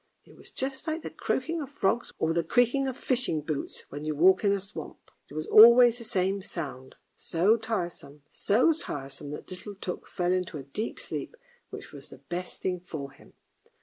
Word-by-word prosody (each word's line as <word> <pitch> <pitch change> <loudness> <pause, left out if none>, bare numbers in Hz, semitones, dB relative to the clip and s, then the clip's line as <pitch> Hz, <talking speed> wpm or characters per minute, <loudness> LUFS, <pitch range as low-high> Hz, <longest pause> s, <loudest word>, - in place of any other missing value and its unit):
It - - -18
was - - -13
just 265 +3 -4
like 315 +1 -2
the - - -6
croaking 330 0 -2
of 275 - -6
frogs 235 -3 0
or 160 0 +1
the 170 0 +1
creaking 245 - +2
of 260 -1 -4
fishing 245 - +1
boots 150 -1 -4
when 145 +1 -7
you 155 0 -2
walk 185 +6 +5
in 200 - +4
a 200 - +1
swamp. 190 -5 -9 0.2
It 145 - -12
was 155 0 -3
always 235 +2 +8
the - - -7
same 195 -1 0
sound, 135 -8 -6 0.2
so 185 +7 +2
tiresome, 175 -10 -4
so 240 - +3
tiresome 140 - -5
that 150 +5 -8
little 200 +3 -7
Tuk 185 -2 -6
fell 180 -2 -1
into 180 -4 -1
a 140 - -7
deep 205 - -5
sleep, - - -6 0.3
which - - -9
was - - -10
the - - -12
best 180 +1 -6
thing 180 -1 -1
for 155 -6 -7
him. - - -19
185 Hz, 195 wpm, -28 LUFS, 155-235 Hz, 0.3 s, always